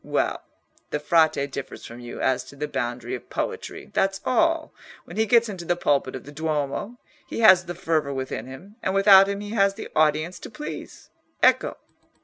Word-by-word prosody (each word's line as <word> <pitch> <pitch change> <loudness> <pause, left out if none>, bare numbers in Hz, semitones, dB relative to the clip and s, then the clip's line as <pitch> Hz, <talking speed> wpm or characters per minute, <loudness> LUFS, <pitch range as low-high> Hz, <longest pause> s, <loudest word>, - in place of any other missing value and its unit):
Well, - - -1 0.5
the 150 - -2
Frate 150 -2 +2
differs 135 0 -7
from 115 +1 -10
you 120 -1 -8
as 130 -1 +1
to - - -13
the 150 +1 -3
boundary 120 -3 -3
of 125 - -7
poetry, - - -5
that's 195 0 +1
all. 330 +3 +1 0.3
When - - -10
he 220 0 +1
gets 235 +2 +5
into 190 -5 -6
the 175 +1 0
pulpit 140 -6 0
of 130 - -7
the 145 - -11
Duomo, 155 - -3 0.3
he - - -4
has 190 -4 +7
the 175 - -6
fervour 160 -5 0
within 130 -3 -4
him, 185 - -12
and 190 - -1
without 195 0 +7
him 200 0 -3
he 205 0 -7
has 200 -3 +2
the 220 - -8
audience 155 +3 +2
to - - -9
please. 300 +6 -8 0.3
Ecco!" - - +4
165 Hz, 190 wpm, -24 LUFS, 140-200 Hz, 0.5 s, has